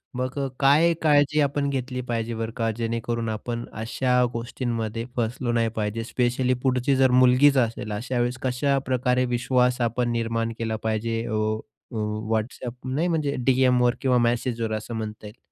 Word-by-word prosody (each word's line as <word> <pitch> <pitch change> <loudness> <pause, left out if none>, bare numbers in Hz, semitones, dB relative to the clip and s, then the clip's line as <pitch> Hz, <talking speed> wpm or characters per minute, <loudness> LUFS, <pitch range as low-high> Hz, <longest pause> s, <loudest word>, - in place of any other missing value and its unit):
मग 130 +2 -3
अ, 135 - 0
काय 150 +5 +5
काळजी 150 -1 +4
आपण 140 0 0
घेतली 125 -1 -3
पाहिजे 115 0 -2
बरं 115 0 -3
का, 115 -1 +1
जेणेकरून 115 0 -2
आपण 115 +2 -4 0.2
अशा 125 +2 +1
गोष्टींमध्ये 115 -1 -3
फसलो 120 +1 -1
नाही 115 -1 +1
पाहिजे? 110 +1 -2
स्पेशली 125 +1 0
पुढची 130 +1 +2
जर 130 -1 +4
मुलगीच 130 +3 +5
असेल, 115 -3 0
अशा 125 +4 -3
वेळेस 120 +1 0
कशाप्रकारे 130 -1 +1
विश्वास 125 0 +1
आपण 120 +1 -1
निर्माण 115 0 -1
केला 110 -1 -1
पाहिजे. 115 +1 -1
अ, 115 - -3 0.6
अ, 115 - -8 0.4
WhatsApp 115 +2 -3 0.2
नाही 160 +5 +1
म्हणजे 155 -4 0
डी-एमवर 125 -2 +3
किंवा 130 -2 +3
मेसेजवर 115 -2 -1
असं 110 +2 -7
म्हणता 110 -1 -5
येईल? 105 +4 -14
125 Hz, 155 wpm, -25 LUFS, 115-130 Hz, 0.6 s, काय